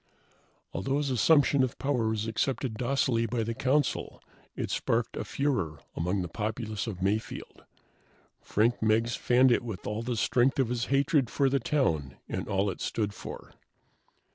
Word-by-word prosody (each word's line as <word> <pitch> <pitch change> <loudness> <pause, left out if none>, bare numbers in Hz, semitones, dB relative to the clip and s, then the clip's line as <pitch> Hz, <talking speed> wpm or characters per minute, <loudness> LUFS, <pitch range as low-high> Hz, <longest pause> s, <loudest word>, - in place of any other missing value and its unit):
Although 135 +9 -1
his 145 -2 -1
assumption 140 +2 +4
of 130 -2 0
power 130 -5 0
was 110 -1 -1
accepted 115 +1 -1
docilely 120 -1 +1
by 115 +1 -1
the 115 +1 -2
Council, 140 +5 0 0.4
it - - -3
sparked 115 0 0
a - - -3
furor 125 - -1 0.2
among 90 +3 0
the - - -4
populace 110 +3 -3
of 95 -4 -4
Mayfield. 105 +3 -3 0.8
Frank 115 +3 +1
Meggs 110 +2 +2
fanned 125 +1 +4
it - - +3
with 110 -7 -6
all 105 +2 -2
the 120 0 -2
strength 130 +5 +2
of 130 -4 +2
his 120 -1 -1
hatred 135 -1 +2
for 135 +2 +2
the 140 +1 +2
town 80 - 0
and - - -4
all 100 +1 +1
it - - -9
stood 105 -3 -1
for. - - -9
115 Hz, 165 wpm, -29 LUFS, 105-135 Hz, 0.8 s, assumption